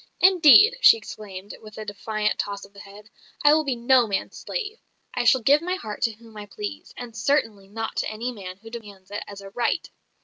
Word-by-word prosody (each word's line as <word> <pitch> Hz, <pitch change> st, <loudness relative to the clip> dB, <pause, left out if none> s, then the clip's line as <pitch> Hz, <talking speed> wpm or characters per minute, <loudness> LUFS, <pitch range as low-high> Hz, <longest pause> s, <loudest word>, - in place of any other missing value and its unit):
"Indeed!" 380 Hz, -, +7 dB
she -, -, +8 dB
exclaimed, 205 Hz, -2 st, -9 dB
with 215 Hz, -1 st, -13 dB
a 215 Hz, -, -6 dB
defiant 210 Hz, +1 st, -2 dB
toss 200 Hz, -1 st, -4 dB
of 200 Hz, -, -21 dB
the 200 Hz, -, -14 dB
head, 205 Hz, +1 st, -14 dB, 0.3 s
"I 290 Hz, -, +8 dB
will 310 Hz, 0 st, +3 dB
be 270 Hz, -4 st, -1 dB
no 240 Hz, 0 st, +3 dB
man's 200 Hz, -2 st, -3 dB
slave; 445 Hz, -2 st, -5 dB, 0.3 s
I 245 Hz, -, -1 dB
shall 255 Hz, +2 st, +5 dB
give 285 Hz, +6 st, +4 dB
my 360 Hz, +2 st, -2 dB
heart 215 Hz, -, -7 dB
to 230 Hz, -, +1 dB
whom 225 Hz, 0 st, -17 dB
I 205 Hz, 0 st, -8 dB
please, 410 Hz, -, -7 dB
and 240 Hz, -2 st, -8 dB
certainly 225 Hz, -10 st, 0 dB
not 225 Hz, +3 st, -5 dB
to -, -, -1 dB
any 230 Hz, +3 st, -4 dB
man 185 Hz, -5 st, -9 dB
who 225 Hz, +3 st, -14 dB
demands 205 Hz, -5 st, -11 dB
it 205 Hz, -, -4 dB
as 200 Hz, -1 st, -10 dB
a 195 Hz, 0 st, -11 dB
right." 240 Hz, +3 st, -1 dB
225 Hz, 215 wpm, -24 LUFS, 205-265 Hz, 0.3 s, she